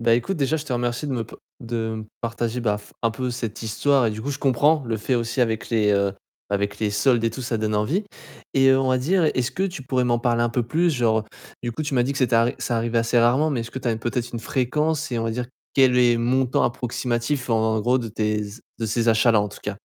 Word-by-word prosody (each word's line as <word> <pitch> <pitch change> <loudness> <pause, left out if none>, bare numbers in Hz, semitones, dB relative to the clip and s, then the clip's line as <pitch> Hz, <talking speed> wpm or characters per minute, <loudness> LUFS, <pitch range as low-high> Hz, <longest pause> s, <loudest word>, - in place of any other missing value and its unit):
Bah 115 0 +4
écoute, 125 +11 -1
déjà, 145 +1 +1
je 150 - -5
te 130 - -5
remercie 120 +4 -1
de 135 - -2
me 115 -2 -2
p - - -13 0.2
de 115 -2 -3
me 110 - -6 0.2
partager 115 +1 -2
bah 105 -3 +1
f 105 - -17
un 115 - +2
peu 125 +2 -3
cette 115 -2 -5
histoire 130 +3 +2
et - - +1
du 110 +1 -6
coup, 140 +5 -3
je 140 - -4
comprends 145 +4 +3
le 115 -1 -2
fait 125 +4 -1
aussi 120 +1 -1
avec 115 -1 0
les, 105 -3 +3
heu, 100 -1 +2 0.4
avec 100 0 -1
les 105 -1 +1
soldes 115 +4 +2
et 115 - +1
tout, 125 - -7
ça 115 -2 -2
donne 110 0 -1
envie. 150 - 0 0.5
Et 135 0 +4
heu, 130 0 +4
on 130 - 0
va 130 0 +3
dire 170 +6 +2
est-ce 125 -1 -1
que 190 - -2
tu 180 -7 -3
pourrais 130 -1 0
m'en 120 -1 +2
parler 120 -1 +1
un 120 - +2
peu 120 +1 0
plus 165 +8 +1
genre 115 -5 +1 0.4
du 120 - -2
coup, 155 - -4
tu 145 -2 -3
m'as 120 - +4
dit 130 - -1
que 135 - -4
c'était 125 -2 +2
ar 115 +1 +4
ça 120 - -1
arrivait 115 0 0
assez 115 +1 +2
rarement, 130 +7 +3
mais 125 -5 -1
est-ce 115 - -6
que 130 - -5
tu 125 - -7
as 115 - 0
peut-être 120 +2 -3
une 120 - -4
fréquence? 150 +5 -1
Et 120 - 0
on 115 - -2
va 115 - -1
dire, 120 +2 -3 0.3
quel 130 -2 +4
est 120 -1 +5
le - - -1
montant 125 +2 +1
approximatif 125 +2 -2
en 110 -1 +2
gros 125 +4 +2
de 115 -3 -4
tes 105 0 -1
z 105 +2 -9 0.2
de 115 - 0
ces 115 +2 0
achats-là 115 0 +4
en 105 - -1
tout 100 - -12
cas? 105 -1 -4
120 Hz, 280 wpm, -23 LUFS, 115-130 Hz, 0.5 s, est